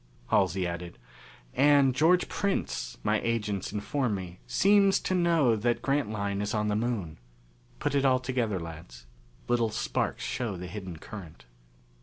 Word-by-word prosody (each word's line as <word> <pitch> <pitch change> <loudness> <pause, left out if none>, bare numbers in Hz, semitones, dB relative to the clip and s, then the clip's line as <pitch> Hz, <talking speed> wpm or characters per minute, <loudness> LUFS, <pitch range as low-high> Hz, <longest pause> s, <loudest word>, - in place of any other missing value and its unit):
Halsey 90 +2 +2
added, 85 0 -5 0.6
"And 140 -1 +5
George 165 +7 +3
Prince, 125 - -2
my - - +1
agents 105 -4 -1
inform 105 +3 -1
me, 90 -2 -7
seems 200 0 +4
to - - -1
know 165 -9 +3
that 120 +3 0
Grantline 105 -8 -1
is 105 +2 -2
on 105 0 0
the 105 - +1
Moon. 105 - -2 0.6
Put 145 0 -1
it 140 -1 +2
all 130 -1 +4
together, 125 -6 -1
lads. 80 -5 -9 0.4
Little 120 -2 +2
sparks 110 - -2
show 115 -7 -3
the 90 - -6
hidden 90 -2 -7
current. 85 - -10
110 Hz, 145 wpm, -28 LUFS, 95-135 Hz, 0.6 s, And